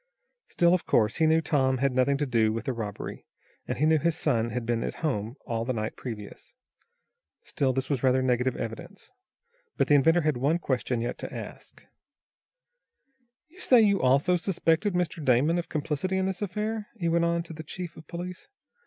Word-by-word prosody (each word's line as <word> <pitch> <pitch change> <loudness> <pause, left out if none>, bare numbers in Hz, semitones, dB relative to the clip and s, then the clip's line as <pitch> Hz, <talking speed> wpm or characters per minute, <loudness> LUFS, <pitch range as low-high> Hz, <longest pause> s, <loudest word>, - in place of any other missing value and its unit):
Still, 170 0 +3
of 180 - 0
course, 110 -1 +2
he 160 - +3
knew 160 +1 +4
Tom 135 -4 +1
had 135 +1 +1
nothing 130 +2 +2
to 145 - 0
do 115 -4 +2
with 115 +1 -4
the 130 - -1
robbery, 105 -4 -6 0.4
and 125 - -3
he 150 - +2
knew 160 0 +4
his 170 +1 0
son 120 -8 +1
had 120 +1 -4
been 115 0 0
at - - -4
home 115 -5 -2
all 115 -1 -2
the 130 +2 -2
night 110 -1 -3
previous. 105 -5 -9 0.9
Still 135 -3 0
this 130 +1 -2
was 140 -4 -1
rather 130 0 +3
negative 125 0 +1
evidence. 115 - -7 0.7
But - - +1
the - - +5
inventor 165 +5 +5
had 155 -4 0
one 145 +7 +2
question 130 -6 -1
yet 120 - -3
to - - -6
ask. - - -9 1.6
"You 350 +4 -20
say 255 -8 +5
you 200 -3 +3
also 140 +8 +3
suspect 170 0 0
Mr. 180 -4 -1
Damon 140 +7 +3
of 170 - -6
complicity 155 +5 -2
in 190 - +1
this 190 +1 -3
affair?" 210 +2 -3
he 170 -5 -2
went 170 0 +2
on, 170 0 0
to 165 - -10
the 160 - -7
chief 170 +2 -7
of 160 - -13
police. 180 +1 -7
145 Hz, 195 wpm, -27 LUFS, 125-170 Hz, 1.6 s, the